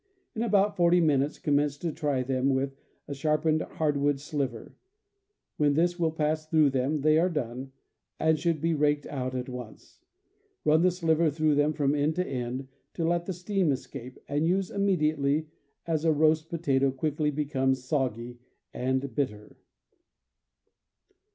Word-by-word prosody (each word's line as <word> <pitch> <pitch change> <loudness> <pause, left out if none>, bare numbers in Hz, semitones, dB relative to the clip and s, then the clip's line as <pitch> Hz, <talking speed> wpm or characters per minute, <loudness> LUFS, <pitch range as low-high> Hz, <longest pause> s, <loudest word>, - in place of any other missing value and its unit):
In 220 - -2
about 205 -2 +2
forty 175 -1 +4
minutes 145 -3 +2
commence 145 -1 +1
to 165 +2 -3
try 145 -4 -1
them 130 +1 0
with 135 +1 -2 0.3
a 145 - -4
sharpened 155 +2 +1
hard 150 -2 -1
wood 140 0 +1
sliver; 135 -5 -4 0.8
when 145 -1 +2
this 175 +2 +1
will 165 -2 +2
pass 155 0 -1
through 155 -3 +4
them 135 +3 0
they 155 +2 +4
are 180 +3 +2
done, 130 -4 -4 0.5
and 160 -1 +2
should 165 -1 0
be 165 0 +1
raked 145 -1 +1
out 130 -2 -4
at 125 -1 -3
once. 125 -3 -10 0.7
Run 155 +1 +4
the 185 - +5
sliver 165 -2 +2
through 155 +1 +1
them 145 +1 +2
from 145 -2 +1
end 150 +2 +1
to 180 +1 0
end, 130 -1 -4 0.3
to 165 -2 -1
let 175 0 0
the - - -1
steam 180 -2 0
escape, 125 -1 -6
and 145 +3 0
use 185 +1 0
immediately, 155 -6 +1 0.4
as 160 -2 -1
a 165 - +4
roast 155 +1 +2
potato 140 -6 +1
quickly 150 +3 -1
becomes 135 -3 0
soggy 125 -3 -2 0.3
and 130 +2 -1
bitter." 105 -7 -3
150 Hz, 155 wpm, -28 LUFS, 135-160 Hz, 0.8 s, the